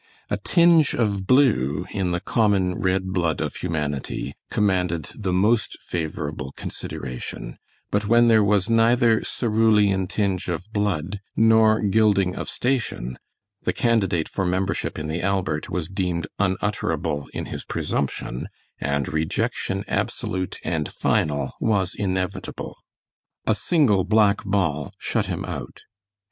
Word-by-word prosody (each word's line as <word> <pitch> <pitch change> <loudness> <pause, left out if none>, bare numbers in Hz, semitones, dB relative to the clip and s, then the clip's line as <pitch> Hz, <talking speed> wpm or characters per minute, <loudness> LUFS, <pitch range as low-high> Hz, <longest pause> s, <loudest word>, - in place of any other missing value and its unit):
A - - +1
tinge 170 -4 +4
of 100 -5 0
blue 105 - +3
in 95 -3 -1
the 90 0 0
common 100 -4 +2
red 95 +1 -1
blood 85 -4 0
of - - -3
humanity 75 -6 -3 0.2
commanded 90 -6 0
the 100 -4 -2
most 105 +5 +2
favorable 75 -5 -4
consideration, 60 -1 -6 0.3
but 100 0 0
when 120 +2 +5
there 110 -2 +5
was 100 -1 +2
neither 115 0 +4
cerulean 105 -4 +2
tinge 100 -2 -1
of 85 +1 -3
blood 100 -2 -1 0.2
nor 110 -1 +5
gilding 100 -3 +3
of - - -4
station 120 - -1 0.4
the - - 0
candidate 95 -9 +1
for 95 - -2
membership 95 +2 -1
in 75 0 -4
the 80 +2 -2
Albert 95 -6 -1
was 90 -4 -2
deemed 90 -3 -2
unutterable 95 -6 -1
in - - -4
his - - -5
presumption, 65 -3 -3 0.3
and 70 -1 -1
rejection 95 +4 -1
absolute 95 -1 -2
and 80 -3 -1
final 70 -3 0
was 95 -4 +1
inevitable. 95 -2 -3 0.7
A 110 - +3
single 110 - +2
black 105 0 +3
ball 80 -8 -1
shut - - -1
him - - -3
out. - - -7
95 Hz, 130 wpm, -23 LUFS, 85-110 Hz, 0.7 s, when